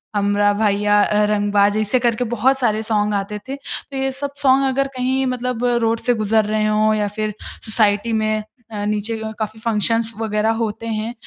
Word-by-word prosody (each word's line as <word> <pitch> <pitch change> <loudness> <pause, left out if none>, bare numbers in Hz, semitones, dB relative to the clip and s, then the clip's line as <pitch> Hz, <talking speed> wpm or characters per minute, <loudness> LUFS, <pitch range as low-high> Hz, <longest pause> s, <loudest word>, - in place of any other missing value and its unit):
हमरा 205 0 +2
भईया 205 0 +2
अ, 210 0 +2
रंगबाज़। 205 0 +2
ऐसे 215 +4 +1
करके 235 0 +1
बहुत 260 +4 +2
सारे 220 -3 +1
सॉन्ग 210 -1 0
आते 205 +1 -3
थे। 270 - -4
तो 280 0 -7
ये 270 0 0
सब 280 +1 -5
सॉन्ग 270 0 +4
अगर 275 +1 0
कहीं 260 +1 0
मतलब 250 -1 -2 0.2
रोड 225 0 +1
से 245 - +3
गुज़र 215 -1 +1
रहे 215 0 0
हों 215 0 +2
या 210 -1 0
फ़िर 215 0 -3 0.3
सोसाइटी 215 0 +1
में 215 -1 0 0.3
अ, 205 -1 -4
नीचे 210 +2 -2
अ, 220 0 -4
काफ़ी 215 0 -4
फंक्शन्स 225 +1 0
वगैरह 220 0 0
होते 225 0 -3
हैं 220 +1 -3
215 Hz, 185 wpm, -20 LUFS, 210-235 Hz, 0.3 s, सॉन्ग